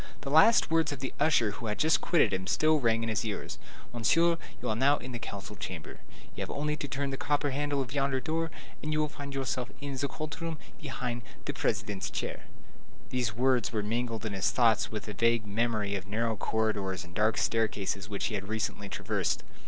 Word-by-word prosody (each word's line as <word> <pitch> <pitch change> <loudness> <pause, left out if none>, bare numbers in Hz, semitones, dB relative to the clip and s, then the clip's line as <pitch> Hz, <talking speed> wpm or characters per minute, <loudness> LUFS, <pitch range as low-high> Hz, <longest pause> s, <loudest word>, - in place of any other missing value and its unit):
The 140 - -4
last 160 +4 +6
words 165 -2 +3
of 145 - -4
the 135 - -4
usher 145 -8 +4
who 115 +3 -6
had 105 - -1
just 160 +1 +4
quitted 140 - +3
him 95 0 -2
still 155 +6 +4
rang 115 -3 +2
in 115 - -1
his 110 +1 0
ears: 110 -3 -4 0.3
"Monsieur, 165 +9 +3 0.2
you - - -4
are 110 - +1
now 140 +5 +4
in 130 - -7
the 120 - -4
council 105 -2 -6
chamber; 90 -5 -6 0.4
you - - -5
have - - -3
only 150 +1 -1
to 145 - -4
turn 140 +1 -2
the 135 - -3
copper 145 0 +1
handle 145 0 0
of 125 0 -9
yonder 135 -2 +1
door, 165 +3 -1 0.3
and 155 - -2
you 155 - +1
will 155 - +2
find 140 -1 -7
yourself 130 -2 -1
in 140 -1 -4
the 140 +2 0
court 155 +3 -6
room, 165 -1 -2 0.2
behind 125 -4 -3 0.2
the - - -2
President's 105 -3 -1
chair." - - -4 0.7
These 120 -4 0
words 125 -1 +3
were 110 -3 -1
mingled 115 +1 -2
in 105 - -2
his 95 -2 +2
thoughts 115 -3 +3
with 105 -1 -5
a 105 - -4
vague 115 +2 +2
memory 105 -1 0
of 100 0 -3
narrow 110 +2 0
corridors 100 -4 0
and 90 0 -13
dark 110 +3 +2
staircases 105 -3 0
which 100 -1 -2
he 115 - -1
had 100 -1 -3
recently 105 -2 -2
traversed. - - -1
120 Hz, 215 wpm, -30 LUFS, 105-145 Hz, 0.7 s, last